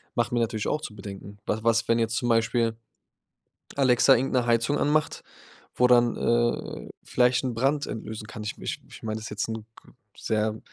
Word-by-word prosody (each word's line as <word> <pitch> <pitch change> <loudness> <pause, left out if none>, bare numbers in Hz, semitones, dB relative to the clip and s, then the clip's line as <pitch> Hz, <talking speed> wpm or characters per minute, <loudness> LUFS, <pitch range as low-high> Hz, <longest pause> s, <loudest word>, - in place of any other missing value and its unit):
macht 120 -1 +1
mir 120 - +2
natürlich 110 -2 -1
auch 150 - 0
zu 110 -8 -7
bedenken. 100 0 -9
W 105 - +1
was, 115 0 +2
wenn 115 0 +3
jetzt 115 0 0
zum 120 - -1
Beispiel 115 0 +2 1.0
Alexa 135 0 +5
irgend 130 +3 -1
'ne 125 -2 +2
Heizung 120 +5 +2
anmacht, 155 +1 +1 0.5
wo 125 - +4
dann, 120 -1 +4
äh, 120 0 0
vielleicht 125 +1 +2
'n 125 - -1
Brand 140 +5 +1
entlösen 110 -1 -6
kann? 110 -2 -8
Ich 105 - -5
m - - -12
ich - - -4
ich - - -13
meine 110 -1 -3
das 110 - -8
ist - - -6
jetzt 105 +2 -2
'n 110 - -2
g 110 - -7 0.5
sehr 110 0 -1
115 Hz, 200 wpm, -26 LUFS, 110-125 Hz, 1.0 s, Alexa